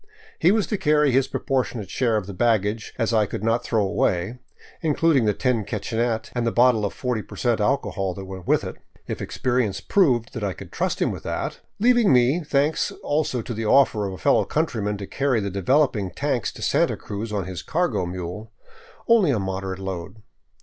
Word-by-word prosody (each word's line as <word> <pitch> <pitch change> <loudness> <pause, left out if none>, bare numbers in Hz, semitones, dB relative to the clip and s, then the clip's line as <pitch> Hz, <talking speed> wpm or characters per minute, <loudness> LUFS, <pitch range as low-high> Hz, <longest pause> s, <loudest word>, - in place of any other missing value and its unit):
He 175 - +5
was 215 -1 +2
to 210 - -2
carry 150 -2 +3
his 135 +1 +3
proportionate 125 -7 -2
share 115 -4 +1
of 105 - -3
such 100 -1 -8
bag 115 -2 +3
gage 110 +2 -4
as 115 -1 0
I 110 -2 +3
could 100 - -5
not 115 +2 +1
throw 110 -4 +1
away^ 95 +4 0 0.4
including 155 -4 +2
the 105 - +3
tin 125 -4 0
kitchenette 110 +2 -2
and 120 - -1
the - - +2
bottle 120 -3 +4
of 100 - -2
40 125 -4 -2
percent, 115 +1 -1
alcohol 105 -6 0
that 95 - -7
went 95 -1 -9
with - - +3
it - - -6 0.2
— - - -29
if - - -4
experience 120 -6 -1
proved 120 - +1
I 100 -2 -1
could - - -11
trust - - -1
him - - +1
with - - -6
that - - -4
— - - -48
leaving 240 -2 +4
me, 130 +7 +3
thanks 150 +1 +1
also 145 -5 0
to 120 - -5
the 110 0 -3
offer 110 -6 +4
of 95 - -5
a - - -7
fellow 75 - +3
countryman 110 -10 -1
to 100 - -6
carry 135 +2 0
the 100 -1 -3
developing 105 - +1
tanks 135 -1 -1
to - - -8
Santa - - +2
Cruz 105 +2 -6
on 100 -4 -2
his 95 -1 -6
cargo 170 - 0
mule, 90 +5 -6 0.6
only 225 -8 +5
a 130 - +2
moderate 95 -1 -3
load. 95 +2 -6
115 Hz, 205 wpm, -23 LUFS, 100-135 Hz, 0.6 s, He